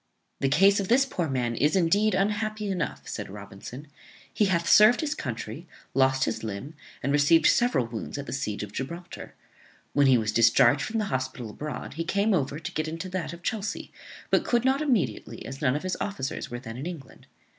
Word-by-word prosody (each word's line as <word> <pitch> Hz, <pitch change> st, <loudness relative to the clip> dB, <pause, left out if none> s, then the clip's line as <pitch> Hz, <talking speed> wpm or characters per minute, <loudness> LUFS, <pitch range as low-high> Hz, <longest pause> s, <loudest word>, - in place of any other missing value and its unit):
"The 135 Hz, -, +1 dB
case 195 Hz, +8 st, +5 dB
of 195 Hz, -, -2 dB
this 260 Hz, +5 st, +4 dB
poor 175 Hz, -, -2 dB
man 125 Hz, -3 st, -1 dB
is, 150 Hz, -, +2 dB
indeed, 195 Hz, +4 st, +3 dB
unhappy 210 Hz, +1 st, -1 dB
enough," 180 Hz, -4 st, -3 dB
said -, -, -5 dB
Robinson. 100 Hz, +7 st, -9 dB, 0.5 s
"He 210 Hz, -, +3 dB
hath 170 Hz, -3 st, +1 dB
served 215 Hz, +6 st, +7 dB
his 300 Hz, -2 st, -1 dB
country, 120 Hz, -, -6 dB, 0.3 s
lost 135 Hz, 0 st, +3 dB
his -, -, -2 dB
limb, 110 Hz, +8 st, -5 dB, 0.3 s
and 140 Hz, -, 0 dB
received 150 Hz, +3 st, +4 dB
several 240 Hz, -, +3 dB
wounds 115 Hz, +4 st, -6 dB
at 140 Hz, -, -5 dB
the -, -, -6 dB
siege 110 Hz, -7 st, -3 dB
of 105 Hz, -, -7 dB
Gibraltar. 170 Hz, -, -7 dB, 0.6 s
When 145 Hz, -1 st, +4 dB
he 130 Hz, -2 st, +6 dB
was 110 Hz, -2 st, 0 dB
discharged 120 Hz, +5 st, +5 dB
from 220 Hz, +8 st, -2 dB
the 215 Hz, -, 0 dB
hospital 130 Hz, -3 st, -3 dB
abroad 150 Hz, +6 st, -6 dB
he 165 Hz, +3 st, -3 dB
came 200 Hz, +5 st, +1 dB
over 145 Hz, -4 st, 0 dB
to 155 Hz, -, -6 dB
get 155 Hz, 0 st, -2 dB
into 165 Hz, +4 st, -5 dB
that 180 Hz, -4 st, -3 dB
of 170 Hz, 0 st, -11 dB
Chelsea, 220 Hz, -2 st, -3 dB, 0.4 s
but -, -, +4 dB
could 240 Hz, 0 st, +1 dB
not 265 Hz, +2 st, +3 dB
immediately, 255 Hz, -, -1 dB
as 135 Hz, 0 st, -8 dB
none 130 Hz, -2 st, +2 dB
of 150 Hz, -, -3 dB
his 185 Hz, 0 st, -1 dB
officers 135 Hz, -10 st, -3 dB
were 120 Hz, -, -5 dB
then 115 Hz, -2 st, -8 dB
in 140 Hz, +6 st, -5 dB
England. 160 Hz, -7 st, -9 dB
155 Hz, 200 wpm, -27 LUFS, 130-200 Hz, 0.6 s, served